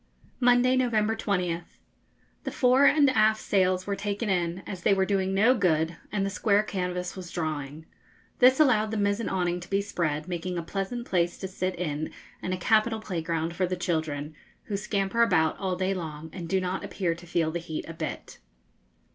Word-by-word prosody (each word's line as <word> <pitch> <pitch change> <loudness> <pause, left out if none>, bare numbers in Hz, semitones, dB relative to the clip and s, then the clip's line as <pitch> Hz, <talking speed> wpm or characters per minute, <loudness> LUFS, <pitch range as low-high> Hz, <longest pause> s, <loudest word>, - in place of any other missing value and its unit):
Monday, 250 0 +4
November 225 -4 +2
20th. 180 -6 -2 0.7
The - - -3
fore 260 +1 +4
and 290 0 +6
aft 215 -2 +3
sails 185 -2 +1
were 200 - -1
taken 205 +1 -2
in, 175 0 -1
as 185 -3 -6
they 195 - +4
were 190 0 +2
doing 190 -1 0
no 215 +6 +5
good 165 -7 +1 0.2
and 200 -2 0
the 195 - -2
square 205 +1 +2
canvas 180 -3 -3
was 185 -2 -8
drawing. 155 -3 -4 0.5
This 255 +2 +6
allowed 220 -8 +4
the 220 - -2
mizen 205 +2 0
awning 180 -2 0
to 175 - -11
be 195 - +2
spread, 160 -6 -2
making 180 0 -3
a 170 - -2
pleasant 200 +7 -4
place 175 -4 0
to 190 - -5
sit 185 0 -3
in 155 -3 -3 0.3
and 185 - -3
a 185 - -1
capital 220 +4 +2
playground 165 -4 -3
for 185 0 +1
the 185 0 -2
children, 155 -4 -2 0.3
who 205 - -4
scamper 200 +2 0
about 180 -9 +3
all 190 -2 -1
day 185 +1 0
long, 160 -3 -6
and 170 -3 -6
do 190 - +2
not 185 0 -3
appear 180 -4 -1
to 170 +1 -12
feel 165 -2 0
the 170 - -2
heat 165 -2 -5
a 165 - -6
bit. 160 -1 -6
185 Hz, 190 wpm, -27 LUFS, 170-210 Hz, 0.7 s, and